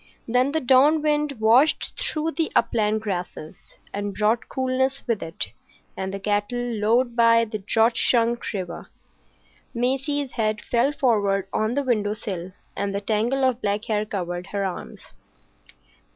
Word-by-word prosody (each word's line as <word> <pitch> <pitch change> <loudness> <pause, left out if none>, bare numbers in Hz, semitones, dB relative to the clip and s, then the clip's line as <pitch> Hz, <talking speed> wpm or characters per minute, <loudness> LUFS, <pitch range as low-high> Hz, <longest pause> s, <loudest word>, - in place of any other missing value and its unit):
Then 250 +4 +2
the 320 - +1
dawn 285 +4 +4
wind 300 -1 +1
washed 235 +5 +3
through 315 +1 -1
the 325 -1 -1
upland 215 -2 +2
grasses, 180 -6 -5 0.4
and 205 0 -3
brought 220 +2 +1
coolness 260 +1 -1
with 230 -4 -1
it, 165 +1 -5 0.4
and 190 0 -4
the 195 - -5
cattle 205 +3 -1
lowed 240 +1 +1
by 230 -1 +5
the 215 -1 -5
drought 225 +4 +2
shrunk 235 -1 +2
river. 185 -5 -6 0.9
Maisie's 270 +3 -1
head 215 -2 -1
fell 240 +5 +1
forward 200 -8 +1
on 220 +3 0
the 285 - +1
window 215 -5 0
sill, 185 -4 -5 0.2
and 200 0 -2
the 200 - -1
tangle 225 +6 0
of 255 -1 +1
black 205 +1 -1
hair 210 -1 0
covered 180 -3 -4
her 200 -1 -2
arms. 185 - -7
230 Hz, 150 wpm, -24 LUFS, 205-255 Hz, 0.9 s, by